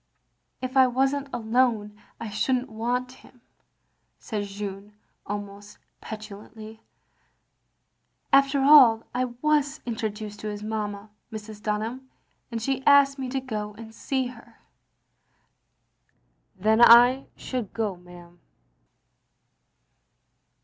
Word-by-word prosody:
" -, -, -49 dB
" -, -, -49 dB
If 255 Hz, +1 st, -4 dB
I 260 Hz, -1 st, +6 dB
was 265 Hz, +2 st, +1 dB
n't 280 Hz, -1 st, -4 dB
alone 225 Hz, -3 st, 0 dB
— -, -, -34 dB
I 230 Hz, -, -6 dB
should 255 Hz, +5 st, +1 dB
n't 250 Hz, +1 st, -3 dB
want 245 Hz, +3 st, -2 dB
him," 255 Hz, -1 st, -19 dB, 0.8 s
said 210 Hz, -2 st, -4 dB
Jeanne, 200 Hz, 0 st, -7 dB, 0.3 s
almost 205 Hz, 0 st, -7 dB, 0.2 s
petulantly. 215 Hz, +1 st, -10 dB, 1.5 s
"After 275 Hz, 0 st, +4 dB
aU 260 Hz, -6 st, +7 dB
I 250 Hz, +1 st, 0 dB, 0.2 s
was 295 Hz, -2 st, +1 dB
introduced 215 Hz, -2 st, -5 dB
to 215 Hz, -, -6 dB
his 210 Hz, 0 st, -5 dB
mamma, 210 Hz, -1 st, -5 dB, 0.2 s
Mrs. 215 Hz, -1 st, -9 dB
Dunham, 225 Hz, +5 st, -3 dB, 0.4 s
and 230 Hz, -2 st, -4 dB
she 265 Hz, +3 st, -2 dB
asked 280 Hz, -1 st, +5 dB
me 260 Hz, -1 st, -4 dB
to 270 Hz, +1 st, -2 dB
go 210 Hz, -5 st, -5 dB
and 225 Hz, 0 st, -11 dB
see 265 Hz, +2 st, -2 dB
her. 245 Hz, -2 st, -11 dB, 1.2 s
" -, -, -46 dB
"Then 220 Hz, +2 st, +4 dB
I 245 Hz, +3 st, +7 dB
should 250 Hz, -6 st, -5 dB
go, 220 Hz, -4 st, -2 dB
ma'am." 175 Hz, -1 st, -16 dB
225 Hz, 120 wpm, -25 LUFS, 210-255 Hz, 1.5 s, aU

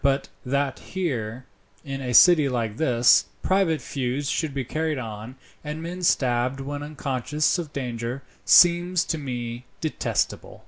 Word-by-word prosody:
But 140 Hz, 0 st, +1 dB
that 140 Hz, +1 st, -1 dB
here, 130 Hz, -, -4 dB, 0.4 s
in 135 Hz, -1 st, -5 dB
a 125 Hz, -2 st, -2 dB
city 155 Hz, -3 st, +7 dB
like 115 Hz, -4 st, -2 dB
this, 125 Hz, -6 st, +4 dB, 0.2 s
private 185 Hz, -5 st, +2 dB
feuds 135 Hz, +1 st, -3 dB
should 160 Hz, -3 st, -1 dB
be 135 Hz, -2 st, -3 dB
carried 155 Hz, +3 st, -2 dB
on, 110 Hz, 0 st, -7 dB, 0.3 s
and 150 Hz, +1 st, -5 dB
men 180 Hz, +2 st, -6 dB
stabbed 130 Hz, -5 st, +1 dB
when 145 Hz, +1 st, -5 dB
unconscious 150 Hz, +2 st, -1 dB
of 160 Hz, -4 st, -5 dB
danger, 125 Hz, -1 st, -4 dB, 0.2 s
seems 175 Hz, 0 st, +5 dB
to 160 Hz, -, -3 dB
me 120 Hz, -3 st, -5 dB
detestable." 155 Hz, -, -2 dB
140 Hz, 140 wpm, -24 LUFS, 125-155 Hz, 0.4 s, city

